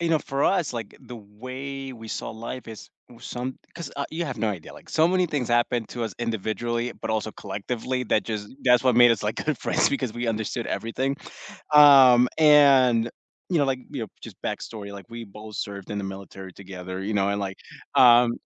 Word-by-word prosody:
you 170 - 0
know, 165 -1 +3
for 140 -1 -3
us, 180 -8 +1
like, 115 -4 -6
the 120 - -10
way 130 +6 -7
we 115 -2 -10
saw - - -4
life 115 +3 -7
is 110 -2 -10 0.2
was 120 0 -15
some 125 +2 -5 0.2
'cause, 170 -1 -7
uh, 140 - -2
you 170 +2 -3
have 130 -5 -4
no 110 - 0
idea, 95 -6 -6
like, - - -15
so 160 - +4
many 180 +1 +2
things 145 -6 -2
happened 120 -1 +1
to 120 - -4
us 115 - -3
individually, 115 +1 -2
but - - -4
also 110 0 -1
collectively 115 +6 -4
that 110 -2 +1
just 105 -2 -4 0.2
that's 125 -2 +5
what 130 -3 +3
made 120 -1 +8
us, 110 - -3
like, 105 +1 -2
good 155 -2 0
friends - - +2
because 130 -5 -2
we 120 +1 -4
understood 115 +1 -2
everything, 130 +5 -2 0.6
um, 135 -4 +8
and 135 -6 +6 0.4
you 175 - +3
know, 145 - +3
like, 135 -1 -1
you 140 -4 -5
know, 110 - -4
just - - -10
backstory, 100 -3 -5
like, 100 -2 -10
we 115 0 -7
both 105 0 -11
served 100 -2 -6
in 105 - -3
the 100 - -3
military 95 -1 -8
together, 95 -1 -8
you 105 +3 -3
know, 100 -1 +2
and 100 0 -1
like, 95 -1 -4 0.4
um 120 -1 +7
120 Hz, 210 wpm, -25 LUFS, 105-130 Hz, 0.6 s, made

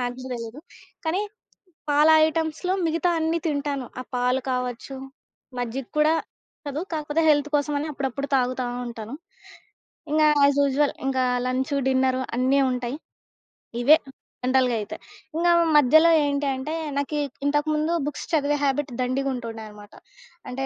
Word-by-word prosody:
నాకు 245 0 -2
గూడా 260 0 -7
దెలీదు. 230 +3 -7 0.5
కానీ, 360 +6 +1 0.7
పాల 295 +2 +5 0.2
ఐటమ్స్‌లో 320 +3 -1
మిగతా 330 +2 +1
అన్నీ 320 +1 +1
తింటాను. 285 -3 -2
ఆ - - -4
పాలు 250 +1 +1
కావచ్చు, 250 +1 -4 0.6
మజ్జిగ 245 +2 -3
కూడా 305 +1 +4 0.5
నచ్చదు. 285 +1 -3
కాకపోతే 300 0 -1
హెల్త్ 290 0 +2
కోసం 290 0 -1
అని 300 - -3
అప్పుడప్పుడు 275 0 -3
తాగుతా 255 0 0 0.2
ఉంటాను. 230 +1 -7 1.0
ఇంగ 310 0 +3 0.2
యాజ్ 280 0 +4
యూజువల్ 280 +1 +2
ఇంగా 260 -1 +1 0.2
లంచు, 260 +3 -1
డిన్నరు 260 0 +2 0.2
అన్నీ 260 +3 +3
ఉంటాయి. 250 +1 -3 0.9
ఇవే 290 +6 +8 0.5
జనరల్‌గాయితే. 250 -5 +1 0.4
ఇంకా 345 +1 +3 0.3
మధ్యలో 315 +4 +6
ఏంటి 285 0 0
అంటే, 265 +4 -4 0.2
నాకి 285 +2 -1 0.3
ఇంతకుముందు 300 +2 +1
బుక్స్ 295 -1 -5
చదివే 295 -1 +2
హాబిట్ 280 0 0
దండిగుంటుండేనమాట. 230 -5 -4 0.6
అంటే, 265 +2 -3
275 Hz, 125 wpm, -24 LUFS, 255-295 Hz, 1.0 s, ఇవే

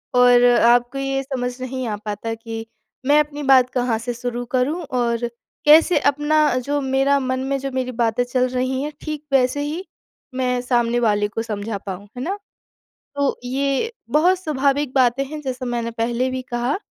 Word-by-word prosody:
और 245 0 +6
आपको 245 +1 +4
ये 270 0 -1
समझ 255 -2 -3
नहीं 255 -1 -4
आ 210 - -2
पाता 210 +2 -3
कि, 225 0 -7 0.4
मैं 290 +2 +5
अपनी 295 -1 -2
बात 260 -2 +5
कहाँ 245 -3 0
से 245 +1 -4
शुरू 245 0 -4
करूँ? 290 +8 +1
और 240 -3 -1 0.4
कैसे 310 +1 +6
अपना 295 0 +2
जो 290 0 0
मेरा 270 +1 +2
मन 260 -1 -1
में 275 +1 -1
जो 275 0 -4
मेरी 255 -1 -2
बातें 235 0 +1
चल 250 +1 0
रही 255 +1 -1
हैं, 300 +1 -3
ठीक 305 -1 -5
वैसे 265 +2 +3
ही 315 +6 -4 0.5
मैं 250 -1 0
सामने 240 -1 +1
वाले 210 -3 +2
को 215 +2 -4
समझा 215 -1 -4
पाऊँ, 195 0 -7
है - - -4
ना? 390 +5 -2 0.8
तो 280 -1 +1
ये, 275 - -1 0.2
बहुत 355 +5 +3
स्वाभाविक 285 -4 0
बातें 255 +1 +3
हैं 300 +2 -7
जैसा 255 -2 -4
मैंने 235 -1 -2
पहले 240 +2 0
भी 255 0 -3
कहा, 245 +4 -2
255 Hz, 175 wpm, -21 LUFS, 240-280 Hz, 0.8 s, और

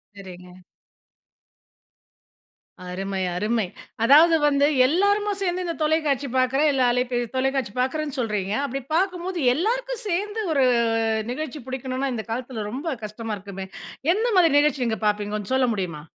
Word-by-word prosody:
சரிங்க. 180 -2 -12 2.3
அருமை, 195 +1 -3
அருமை. 215 +3 0 0.4
அதாவது 310 +7 +7
வந்து 285 -1 +4 0.2
எல்லாருமா 405 +6 +2
சேர்ந்து 365 -1 -1
இந்த 335 -1 -3
தொலைக்காட்சி 300 -3 +1
பார்க்கிறேன், 265 +4 +3
இல்ல 265 -1 +2
அலைபே 250 0 0 0.2
தொலைக்காட்சி 265 -4 0
பார்க்கிறேன்னு 290 +3 -1
சொல்றீங்க. 210 -4 -1
அப்படி 275 0 -4
பார்க்கும்போது 365 0 -1 0.2
எல்லாருக்கும் - - -1
சேர்ந்து 410 +5 -2
ஒரு 275 -3 +3 0.7
நிகழ்ச்சி 300 +1 -5
புடிக்கணுன்னா, 260 +1 -3
இந்த 220 - -5
காலத்தில 240 -3 -4
ரொம்ப 275 +8 -5 0.2
கஷ்டமா 215 +1 -5
இருக்குமே. 195 -1 -8 0.5
எந்த 440 +5 0
மாதிரி 330 -5 +5
நிகழ்ச்சி 280 -4 +1
நீங்க 220 -3 -1
பார்ப்பீங்க, 210 0 0
கொஞ்சம் 210 +4 -4
சொல்ல 260 -1 +3
முடியுமா? 175 -6 -4
260 Hz, 130 wpm, -24 LUFS, 215-320 Hz, 2.3 s, அதாவது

